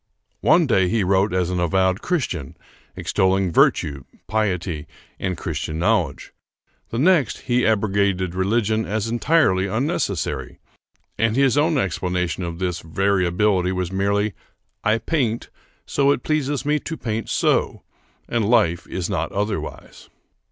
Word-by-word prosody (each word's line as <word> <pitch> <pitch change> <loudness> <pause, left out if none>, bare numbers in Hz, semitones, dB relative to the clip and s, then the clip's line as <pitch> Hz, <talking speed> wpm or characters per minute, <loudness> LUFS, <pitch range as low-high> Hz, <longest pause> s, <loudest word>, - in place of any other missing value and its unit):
One 170 -1 +4
day 95 -8 +3
he 110 0 +1
wrote 95 +2 +2
as 90 -1 0
an 90 - -1
avowed 95 +3 +1
Christian, 105 - -2 0.4
extolling 95 -1 +1
virtue, 70 -3 +2 0.2
piety, 90 -7 -2 0.3
and 90 -3 -2
Christian 80 - -4
knowledge; 90 -4 0 0.6
the 115 - -4
next, 155 0 +2
he 125 -2 +1
abrogated 100 -4 +1
religion 110 +3 +1
as 105 +1 -1
entirely 120 - +2
unnecessary: 110 - -2 0.6
and 115 0 +2
his 135 -1 +3
own 155 +1 +2
explanation 90 - -1
of 85 -2 -4
this 90 -2 -2
variability 95 +2 +1
was 90 -1 -2
merely 100 +2 0 0.5
"I 110 +2 +3
paint 120 -2 -1 0.3
so 140 - 0
because 140 - +5
it - - -12
pleases 145 -2 -1
me 150 +1 +2
to 160 +1 -6
paint 110 -1 -3
so, - - +1 0.4
and 115 -3 0
life 100 -9 +2
is - - -3
not - - -2
otherwise." 105 +1 -4
100 Hz, 135 wpm, -22 LUFS, 90-115 Hz, 0.6 s, because